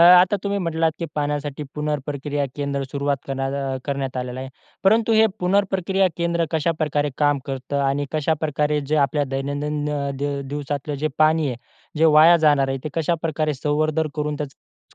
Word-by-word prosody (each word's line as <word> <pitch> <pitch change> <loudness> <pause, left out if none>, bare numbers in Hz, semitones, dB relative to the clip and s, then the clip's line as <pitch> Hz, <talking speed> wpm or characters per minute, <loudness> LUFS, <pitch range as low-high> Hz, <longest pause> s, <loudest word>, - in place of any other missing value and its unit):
आता 180 +3 +7
तुम्ही 200 0 0
म्हटलात 165 -2 0
की 170 - -3
पाण्यासाठी 145 -1 -2
पुनर्प्रक्रिया 145 -1 -2
केंद्र 140 -1 -2
सुरुवात 140 0 0
करण्यात 135 0 -2
करण्यात 140 -2 -3
आलेला 125 0 -4
आहे. 130 - -6 0.4
परंतु 220 +3 +4
हे 220 0 +6
पुनर्प्रक्रिया 190 0 +2
केंद्र 170 0 0
कशाप्रकारे 155 -2 0
काम 145 -1 +3
करतं 135 +1 -3
आणि 140 +1 0
कशाप्रकारे 150 -1 0
जे 145 +2 -1
आपल्या 145 +2 -1
दैनंदिन 145 +2 -2
अ, 140 -1 -2
दिव 140 0 -2
दिवसातलं 145 0 -3
जे 155 - +3
पाणी 155 0 +4
आहे, 125 - -3 0.4
जे 160 - +4
वाया 160 +2 +7
जाणार 140 -2 +4
आहे, 135 0 -1
ते - - -1
कशाप्रकारे 160 -2 0
संवर्धन 155 +3 0
करून 150 -1 -2
त्याचा 145 -2 -6
युस - - -33
150 Hz, 160 wpm, -22 LUFS, 140-160 Hz, 0.4 s, आता